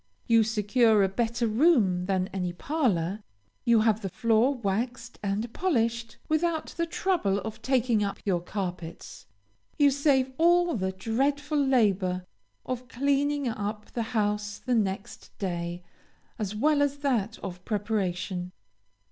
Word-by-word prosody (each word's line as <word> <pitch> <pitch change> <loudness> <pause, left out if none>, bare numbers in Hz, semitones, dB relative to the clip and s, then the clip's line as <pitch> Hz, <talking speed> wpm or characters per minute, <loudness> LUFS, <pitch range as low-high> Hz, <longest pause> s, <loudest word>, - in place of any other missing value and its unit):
You 230 -2 +5
secure 220 0 +3
a - - +4
better 235 +4 -1
room 215 - +3
than 190 -1 +1
any 180 -2 -2
parlor, 210 - 0 0.4
you 235 -2 +5
have 220 -1 +2
the 195 - -3
floor 230 +7 +2
waxed 235 +2 -3
and 210 +3 -2
polished 235 -9 0
without 320 0 0
the 335 0 -1
trouble 335 - 0
of 220 0 -7
taking 240 -3 +2
up 200 -1 -2
your 180 -4 +1
carpets. 180 -3 -6 0.5
You 285 -1 +5
save 270 -2 +2
all 345 0 +4
the 190 -3 -1
dreadful 280 +9 0
labor 195 -8 +2 0.4
of 255 0 -4
cleaning 280 +2 0
up 210 -1 -4
the 235 - -2 0.2
house 210 0 0
the 255 - -2
next 200 -4 -2
day, 175 -2 -3 0.6
as 210 -1 -3
well 295 +6 +3
as 285 0 +1
that 225 -5 0
of 180 -2 -6
preparation. 190 -4 -2
220 Hz, 135 wpm, -27 LUFS, 195-265 Hz, 0.6 s, You